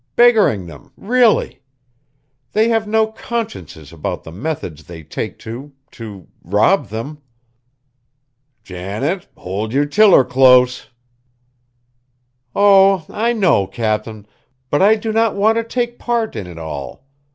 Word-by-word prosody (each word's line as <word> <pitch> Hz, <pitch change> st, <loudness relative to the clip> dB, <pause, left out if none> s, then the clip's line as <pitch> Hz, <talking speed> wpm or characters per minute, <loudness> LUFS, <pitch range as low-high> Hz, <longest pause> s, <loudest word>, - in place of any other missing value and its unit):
Beggaring 220 Hz, -, +4 dB
them, 135 Hz, +11 st, -13 dB
really! 235 Hz, -, +1 dB, 0.9 s
they 220 Hz, +2 st, +2 dB
have 225 Hz, -2 st, 0 dB
no 220 Hz, +1 st, +2 dB
consciences 215 Hz, -, -6 dB
about 80 Hz, -, -5 dB
the 80 Hz, -, -10 dB
methods 90 Hz, -, -5 dB
they 80 Hz, -1 st, -11 dB
take -, -, -6 dB
to 130 Hz, +6 st, -9 dB, 0.2 s
to 105 Hz, -6 st, -10 dB, 0.2 s
rob 105 Hz, -, +2 dB
them!" 125 Hz, +9 st, -7 dB, 1.4 s
"Janet, 105 Hz, -, -4 dB
hold 100 Hz, +4 st, -4 dB
yer 145 Hz, +2 st, +2 dB
tiller 195 Hz, 0 st, +5 dB
close!" 125 Hz, 0 st, +4 dB, 1.7 s
"Oh! 195 Hz, -3 st, +5 dB
I 230 Hz, +3 st, 0 dB
know, 180 Hz, -, +2 dB
Cap'n, 110 Hz, -1 st, -3 dB, 0.5 s
but 145 Hz, -, +2 dB
I 210 Hz, +3 st, +5 dB
do 220 Hz, 0 st, -4 dB
not 225 Hz, 0 st, +1 dB
want 215 Hz, +3 st, +2 dB
to 230 Hz, -, 0 dB
take 240 Hz, +1 st, -3 dB
part 235 Hz, -2 st, -2 dB
in 95 Hz, -, -5 dB
it 85 Hz, -2 st, -11 dB
all. 80 Hz, -, -7 dB
145 Hz, 125 wpm, -18 LUFS, -, 1.7 s, tiller